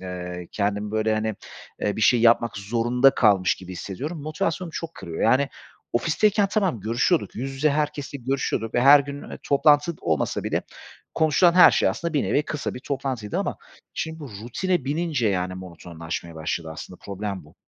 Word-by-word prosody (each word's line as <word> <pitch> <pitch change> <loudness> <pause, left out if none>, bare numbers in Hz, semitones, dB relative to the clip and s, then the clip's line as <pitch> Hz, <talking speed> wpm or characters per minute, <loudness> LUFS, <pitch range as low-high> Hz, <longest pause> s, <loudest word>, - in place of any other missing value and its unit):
Eee, 90 -1 -6
kendimi, 105 0 -1
böyle, 110 0 +1
hani, 110 0 -1 0.5
eee, 105 - -1
bir - - -3
şey 120 +2 +4
yapmak 115 -1 +3
zorunda 120 +6 +3
kalmış 100 -5 +4
gibi 95 0 -10
hissediyorum. 140 - -6
Motivasyonumu 160 +2 -2
çok 165 0 -6
kırıyor, 80 -1 -6
yani, 130 +5 +3 0.4
ofisteyken 200 - +2
tamam, 190 - 0
görüşüyorduk, 120 - 0
yüz 130 +4 -3
yüze 150 +3 +2
herkesle 145 -1 -2
görüşüyorduk 125 -3 -2
ve 120 - +3
her 140 +3 +8
gün, 140 0 -8
eee, - - -7
toplantı 145 +3 +3
olmasa 80 -2 -1
bile - - -1 0.5
konuşulan 165 +2 +4
her 180 - +9
şey - - +2
aslında 160 - -3
bir 145 - +2
nevi 150 - +1
kısa 150 -1 -4
bir 125 - -7
toplantıydı 130 -6 -3
ama - - -2 0.4
şimdi 160 0 -4 0.2
rutine 175 +5 -1
binince, 145 -5 0
yani, 90 -1 -1
monotonlaşmaya 85 -2 -7
başladı 80 +1 -3
aslında, 90 +3 -9
problem 100 -3 -5
bu. 75 - -20
120 Hz, 165 wpm, -24 LUFS, 100-150 Hz, 0.5 s, her